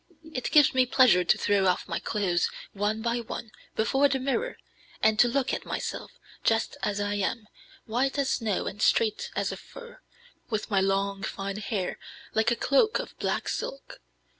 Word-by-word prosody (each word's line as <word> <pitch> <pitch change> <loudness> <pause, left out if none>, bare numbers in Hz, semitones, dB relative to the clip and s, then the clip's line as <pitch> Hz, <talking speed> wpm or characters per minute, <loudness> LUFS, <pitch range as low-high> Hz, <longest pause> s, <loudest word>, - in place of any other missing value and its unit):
It 255 - -2
gives 300 0 +6
me 255 -1 +3
pleasure 240 -9 +5
to 175 - +3
throw 200 -2 +2
off 180 - +1
my - - -2
clothes, 185 -5 0 0.2
one 210 +2 -1
by 235 0 0
one, 230 -1 -6 0.2
before 270 +6 +3
the 270 - +1
mirror, 280 - -2 0.5
and 220 0 +4
to 245 - +7
look 265 +2 0
at - - -2
myself, - - -4 0.3
just 225 0 +1
as 205 -1 -1
I 205 0 -1
am, 205 +2 -2 0.4
white 255 +5 0
as 275 -1 +1
snow 220 -5 0
and 205 - -5
straight 215 -2 +2
as - - 0
a - - -5
fir, - - -13 0.5
with 215 -1 -3
my 195 - +4
long, 195 0 0
fine, 195 0 -4
hair, 200 -3 -3 0.3
like 220 +1 +3
a 240 - +2
cloak 285 - +3
of - - -6
black - - -1
silk. 275 - -5
220 Hz, 180 wpm, -27 LUFS, 200-260 Hz, 0.5 s, to